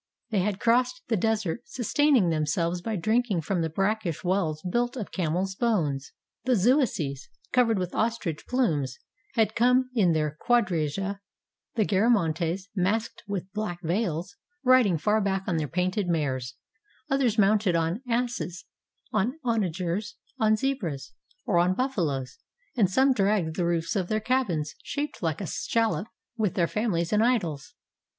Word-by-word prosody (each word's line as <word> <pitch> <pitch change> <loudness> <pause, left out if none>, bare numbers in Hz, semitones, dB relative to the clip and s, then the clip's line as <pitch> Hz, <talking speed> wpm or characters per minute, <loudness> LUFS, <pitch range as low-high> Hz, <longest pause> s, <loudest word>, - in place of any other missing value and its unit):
They 210 - +2
had 195 +1 -1
crossed 250 +8 +2
the 230 - +3
desert, 220 -1 0
sustaining 260 - +2
themselves 165 +3 0
by 220 +3 -2
drink 225 +7 +1
ing 190 -5 +1
from 175 +2 -1
the 160 - 0
brackish 195 0 -1
wells 175 -4 0
built 240 +6 0
of 215 - -5
camels' 180 +2 -1
bones: 165 - 0 0.3
the 250 0 +3
Zuaeces, 190 - +1 0.2
covered 235 -4 +4
with 180 -1 -3
ostrich 220 -9 -2
plumes, 155 - 0 0.4
had 220 -2 +2
come 250 +2 +3
in 190 -8 +3
their 155 -1 0
quadriga; 195 -4 +1 0.6
the 220 -3 +2
Garamantes, 190 -4 +1
masked 210 +4 0
with 195 -2 -4
black 210 -5 -3
veils, 180 +1 -1 0.3
rid 255 -3 +6
ing 175 -4 +1
far 210 +7 +2
back 195 -1 0
on 175 - 0
their 155 -2 -1
painted 185 +4 -1
mares; 130 -7 -1 0.5
others 270 -6 +1
mounted 205 -3 +3
on 165 +6 0
asses, 205 -7 -2 0.5
on 220 +8 +1
onagers, 200 -2 -1 0.2
on 215 -1 +4
zebras; 205 - -3 0.3
or 175 - +2
on 180 +2 +3
buffaloes; 160 - -1 0.4
and 210 -7 +3
some 265 +7 +4
dragged 195 -7 +1
the 175 -2 0
roofs 165 +1 -1
of 190 -3 0
their 215 +2 0
cabins, 210 - 0
shaped 295 +1 -4
like 160 -3 -1
a - - -3
shallop, 225 +3 0 0.3
with 210 -5 0
their 170 - +3
families 195 -5 -1
and 210 +1 +4
idols. 180 - 0
195 Hz, 150 wpm, -27 LUFS, 170-230 Hz, 0.6 s, rid